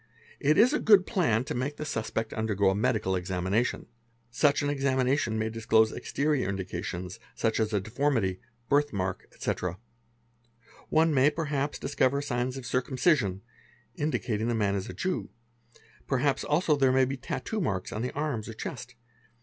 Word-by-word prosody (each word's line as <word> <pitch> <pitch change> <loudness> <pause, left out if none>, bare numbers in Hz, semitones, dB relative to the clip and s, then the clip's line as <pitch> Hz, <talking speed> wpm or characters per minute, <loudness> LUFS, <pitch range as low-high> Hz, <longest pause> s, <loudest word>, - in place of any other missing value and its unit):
It 150 +2 +3
is 250 +6 +6
a - - +2
good 205 -4 +6
plan 155 - +1
to - - -4
make 140 +4 -3
the 150 - -4
suspect 110 -3 -3
_ - - -6
undergo 100 -3 +2
a - - -1
medical 110 -4 +1
examination; 95 +5 -1 0.5
such 145 +4 +2
an 145 - 0
examination 130 -3 +1
may 110 0 0
disclose 110 0 +3
exterior 140 -3 -1
indications, 90 -1 -4 0.2
as 110 -1 +1
a 105 - +2
deformity, 110 -3 0 0.3
birth 145 +1 +2
mark, 95 -2 -3
etc.; 90 0 -3 1.1
one 160 0 +3
may 135 +1 +5
perhap 145 -2 -2
discover 135 0 +1
signs 125 -2 -2
of 130 - -7
circumcision, 125 - +1 0.5
indicating 120 -7 -1
that 120 - 0
the - - -1
man 100 -2 +1
isa 95 -1 -3
Jew; 185 0 -2 0.8
perhaps 135 +1 +1
also 150 +1 +2
there 135 -2 +3
may 130 0 +4
be 135 +2 -3
tattoo 205 - -4
marks 95 - -2
on 105 - -3
the 125 - -2
arms 140 -7 -2
or 110 - -7
chest. 125 +1 -7
125 Hz, 160 wpm, -28 LUFS, 105-145 Hz, 1.1 s, is